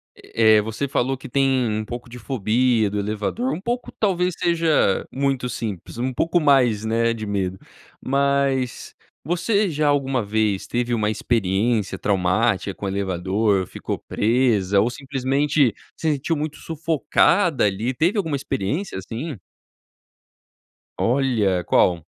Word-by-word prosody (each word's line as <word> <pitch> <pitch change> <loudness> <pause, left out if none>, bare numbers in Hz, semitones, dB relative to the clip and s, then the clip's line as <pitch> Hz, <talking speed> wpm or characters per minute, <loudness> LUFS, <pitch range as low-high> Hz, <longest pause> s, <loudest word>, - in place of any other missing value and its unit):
Eh 110 -1 +3
eh, - - +4
você 110 +6 -3
falou 135 0 0
que 130 - -10
tem 135 -2 +2
um 110 0 -2
pouco 120 +2 -7
de 125 +1 -10
fobia 115 -2 +1
de 105 - -4
elevador, 105 - -2
um - - -5
pouco, 240 +3 -3
talvez, 180 -3 +1
seja 165 - +2
muito 135 -2 -1
simples. 110 -5 -5
Um 130 +2 -2
pouco 165 +7 +1
mais, 125 -8 +3
né, 115 +1 +1
de 110 -2 -6
medo. 95 -2 -2 0.4
Mas, 140 -2 0 0.3
você 200 +4 +1
já 150 -1 0
alguma 135 -3 +1
vez 105 -2 0
teve 120 0 -1
uma 110 -2 +1
experiência 105 -1 0
traumática 100 +1 +1
com 100 - -6
elevador; 95 +1 0
ficou - - -5
presa, 105 -4 +2
ou 115 - +1
simplesmente 135 0 0 0.2
se 160 - 0
sentiu 145 +4 -1
muito 150 0 -4
sufocada 165 0 +1
ali 105 +5 -1
teve 170 - +1
alguma 165 -7 0
experiência 135 - -3
assim? 115 - -6 1.6
Olha! 115 -8 +1
Qual? 85 0 +2
120 Hz, 135 wpm, -22 LUFS, 105-140 Hz, 1.6 s, eh